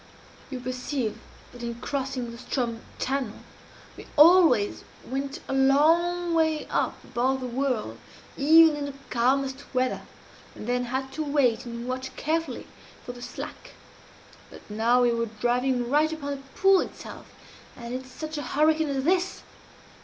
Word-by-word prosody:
"You 260 Hz, -, -5 dB
perceive 250 Hz, -1 st, -3 dB, 0.3 s
that 245 Hz, -, -12 dB
in 235 Hz, 0 st, -4 dB
crossing 260 Hz, -1 st, -3 dB
the 235 Hz, -, -9 dB
Ström 235 Hz, -2 st, -2 dB, 0.2 s
channel, 260 Hz, -4 st, -2 dB, 0.5 s
we -, -, -11 dB
always 305 Hz, -, +6 dB, 0.2 s
went 275 Hz, +4 st, -4 dB
a -, -, -3 dB
long 330 Hz, +6 st, +3 dB
way 315 Hz, -2 st, +2 dB
up -, -, -1 dB
above 260 Hz, +2 st, 0 dB
the 255 Hz, -, -5 dB
whirl, 245 Hz, -, -2 dB, 0.4 s
even 320 Hz, +2 st, +6 dB
in 290 Hz, -1 st, -3 dB
the 280 Hz, -1 st, -6 dB, 0.2 s
calmest 265 Hz, +3 st, +1 dB
weather, 255 Hz, 0 st, +1 dB, 0.5 s
and -, -, -8 dB
then 245 Hz, +1 st, 0 dB
had 265 Hz, +2 st, -3 dB
to 310 Hz, -, -3 dB
wait 270 Hz, -5 st, +1 dB
and 235 Hz, +1 st, -6 dB
watch 255 Hz, +1 st, -4 dB
carefully 315 Hz, -3 st, -2 dB, 0.4 s
for -, -, -5 dB
the 245 Hz, 0 st, -12 dB
slack -, -, -8 dB, 0.8 s
but -, -, -14 dB
now 235 Hz, +4 st, +3 dB
we 240 Hz, -, +4 dB
were 230 Hz, 0 st, -1 dB
driving 245 Hz, +3 st, 0 dB
right 300 Hz, +4 st, +3 dB
upon 290 Hz, -3 st, -4 dB
the 280 Hz, -, -3 dB, 0.2 s
pool 390 Hz, 0 st, +6 dB
itself, -, -, -9 dB, 0.5 s
and 235 Hz, 0 st, -7 dB
in 255 Hz, +1 st, -4 dB
such 310 Hz, +4 st, -6 dB
a 260 Hz, -, -6 dB
hurricane 310 Hz, 0 st, +3 dB
as 270 Hz, -1 st, -1 dB
this! 365 Hz, +4 st, 0 dB
265 Hz, 155 wpm, -26 LUFS, 245-300 Hz, 0.8 s, always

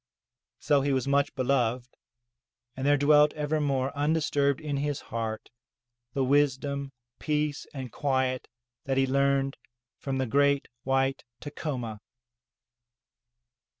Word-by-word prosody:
So 145 Hz, -1 st, +2 dB
he 140 Hz, 0 st, +1 dB
was 130 Hz, 0 st, 0 dB
much 140 Hz, +1 st, +2 dB
beloved, 125 Hz, -2 st, 0 dB, 0.8 s
and 135 Hz, +1 st, -2 dB
there 145 Hz, 0 st, +5 dB
dwelt, 150 Hz, +1 st, +5 dB
evermore 145 Hz, -3 st, -1 dB
un 145 Hz, +2 st, +1 dB
disturbed 145 Hz, -3 st, +1 dB
in 150 Hz, -3 st, -3 dB
his 145 Hz, 0 st, -1 dB
heart, 110 Hz, -1 st, -5 dB, 0.6 s
the 135 Hz, -, +2 dB
wisdom, 140 Hz, 0 st, +1 dB, 0.3 s
peace 150 Hz, -1 st, -1 dB
and 130 Hz, -4 st, -6 dB
quiet 130 Hz, -2 st, 0 dB, 0.4 s
that 135 Hz, -1 st, -1 dB
he 135 Hz, -, +4 dB
learned 135 Hz, 0 st, +1 dB, 0.4 s
from 135 Hz, -1 st, -3 dB
the 130 Hz, -, 0 dB
great 140 Hz, +3 st, +2 dB
white 135 Hz, +1 st, 0 dB, 0.2 s
Tacoma. 130 Hz, -7 st, -5 dB
140 Hz, 115 wpm, -28 LUFS, 130-145 Hz, 0.8 s, there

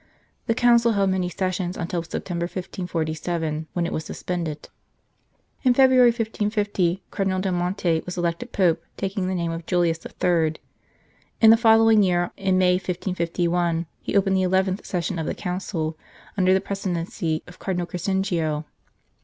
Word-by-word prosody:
The 230 Hz, -, +2 dB
Council 235 Hz, -1 st, +4 dB
held 195 Hz, -2 st, +2 dB
many 185 Hz, -1 st, 0 dB
sessions 185 Hz, 0 st, -2 dB
until 170 Hz, 0 st, -2 dB
September, 170 Hz, +1 st, -4 dB
1547, 165 Hz, -3 st, -3 dB
when 175 Hz, -1 st, 0 dB
it -, -, -3 dB
was 155 Hz, -, -2 dB
suspended. 160 Hz, -2 st, -4 dB, 0.9 s
In 250 Hz, -2 st, +3 dB
February, 260 Hz, -2 st, +6 dB
1550, 210 Hz, -5 st, -1 dB
Cardinal 190 Hz, -1 st, 0 dB
del 190 Hz, 0 st, -1 dB
Monte 175 Hz, -2 st, 0 dB
was 180 Hz, 0 st, -6 dB
elected 175 Hz, +8 st, -2 dB
Pope, 175 Hz, -4 st, +2 dB, 0.2 s
taking 195 Hz, -1 st, -2 dB
the 185 Hz, -, -1 dB
name 170 Hz, -2 st, -1 dB
of 165 Hz, 0 st, -6 dB
Julius 175 Hz, -3 st, +1 dB
III. 165 Hz, -3 st, 0 dB, 0.8 s
In 225 Hz, -1 st, +8 dB
the -, -, +8 dB
following 225 Hz, -1 st, +5 dB
year, 175 Hz, -2 st, +1 dB
in 190 Hz, -2 st, +1 dB
May, 180 Hz, -1 st, +4 dB
1551, 175 Hz, -2 st, -1 dB, 0.2 s
he -, -, 0 dB
opened 195 Hz, -1 st, +2 dB
the -, -, +2 dB
eleventh 190 Hz, +1 st, +1 dB
session 175 Hz, -1 st, -2 dB
of 160 Hz, -, -3 dB
the -, -, -2 dB
Council, 180 Hz, -4 st, -3 dB, 0.4 s
under 185 Hz, -2 st, +3 dB
the 190 Hz, 0 st, +4 dB
presi 195 Hz, -1 st, -3 dB
dency 165 Hz, -1 st, -2 dB
of 175 Hz, -, -14 dB
Cardinal 180 Hz, -2 st, -2 dB
Crescenzio. 175 Hz, -4 st, -1 dB
180 Hz, 155 wpm, -24 LUFS, 170-195 Hz, 0.9 s, In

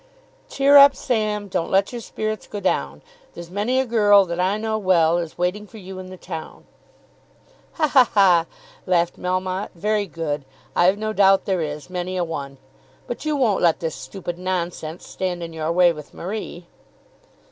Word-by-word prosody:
"Cheer 280 Hz, +1 st, +5 dB
up, 280 Hz, -1 st, +8 dB
Sam; 210 Hz, -3 st, -1 dB
Don't 180 Hz, -3 st, -2 dB
let 195 Hz, +1 st, +2 dB
your 240 Hz, -1 st, -6 dB
spirits 215 Hz, 0 st, -4 dB
go 205 Hz, -, -6 dB
down. 190 Hz, -, -2 dB, 0.3 s
There's 170 Hz, 0 st, -9 dB
many 215 Hz, +7 st, 0 dB
a 265 Hz, -, +1 dB
girl 205 Hz, -4 st, +5 dB
that 170 Hz, 0 st, -4 dB
I 190 Hz, +3 st, +1 dB
know 220 Hz, 0 st, -2 dB
well, 175 Hz, -4 st, +3 dB
Is 165 Hz, -2 st, -6 dB
waiting 180 Hz, +4 st, -2 dB
for 220 Hz, -, -13 dB
you 190 Hz, -2 st, -9 dB
in 185 Hz, -, -8 dB
the 185 Hz, 0 st, -10 dB
town." 165 Hz, -3 st, -8 dB, 1.1 s
"Ha, 310 Hz, -, +1 dB
ha, 260 Hz, -4 st, +5 dB
ha," 180 Hz, -5 st, +5 dB, 0.4 s
laughed 175 Hz, -2 st, +1 dB
Melmotte, 185 Hz, +1 st, -2 dB
"very 210 Hz, +3 st, 0 dB
good. 150 Hz, -3 st, -4 dB, 0.3 s
I've 185 Hz, +3 st, +4 dB
no 215 Hz, +1 st, -3 dB
doubt 195 Hz, -2 st, +4 dB
there 190 Hz, -3 st, 0 dB
is, 150 Hz, -1 st, -5 dB
many 180 Hz, 0 st, -4 dB
a 180 Hz, -, +1 dB
one. 140 Hz, -5 st, -6 dB, 0.5 s
But 240 Hz, -, -6 dB
you 305 Hz, -1 st, 0 dB
won't 235 Hz, -8 st, +1 dB
let 170 Hz, -2 st, +3 dB
this 165 Hz, -3 st, -3 dB
stupid 175 Hz, -3 st, -7 dB
nonsense 175 Hz, -3 st, -4 dB
stand 180 Hz, -2 st, -4 dB
in 165 Hz, -1 st, -7 dB
your 160 Hz, 0 st, -2 dB
way 175 Hz, 0 st, +4 dB
with 150 Hz, -2 st, -12 dB
Marie." 180 Hz, -2 st, -6 dB
185 Hz, 180 wpm, -22 LUFS, 170-210 Hz, 1.1 s, up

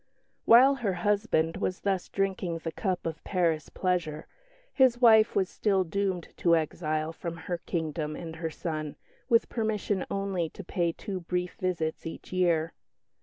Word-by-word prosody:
While 255 Hz, +4 st, +8 dB
her 215 Hz, -7 st, -1 dB
husband 200 Hz, -5 st, +1 dB
was 185 Hz, -, -2 dB
thus 195 Hz, -3 st, -1 dB
drinking 190 Hz, -4 st, -1 dB
the 165 Hz, -, -3 dB
cup 185 Hz, +1 st, -2 dB
of 165 Hz, -1 st, -4 dB
Paris 170 Hz, -5 st, 0 dB
pleasure, 175 Hz, -5 st, -1 dB, 0.5 s
his 255 Hz, -3 st, +4 dB
wife 220 Hz, -2 st, +6 dB
was 190 Hz, -2 st, +2 dB
still 195 Hz, -1 st, +1 dB
doomed 185 Hz, 0 st, -2 dB
to 170 Hz, -1 st, +4 dB
exile 155 Hz, 0 st, -1 dB
from 170 Hz, 0 st, -6 dB
her 175 Hz, +1 st, -4 dB
kingdom 155 Hz, -3 st, -3 dB
and 165 Hz, -1 st, -7 dB
her 165 Hz, 0 st, -3 dB
son, 155 Hz, -2 st, -4 dB, 0.3 s
with 230 Hz, -2 st, +4 dB
permission 215 Hz, -4 st, -1 dB
only 195 Hz, -4 st, -1 dB
to 200 Hz, -, -10 dB
pay 175 Hz, -1 st, 0 dB
two 190 Hz, +2 st, -5 dB
brief 180 Hz, +1 st, -2 dB
visits 165 Hz, -4 st, -2 dB
each 165 Hz, -, -9 dB
year. 170 Hz, -3 st, +2 dB
180 Hz, 155 wpm, -28 LUFS, 165-200 Hz, 0.5 s, While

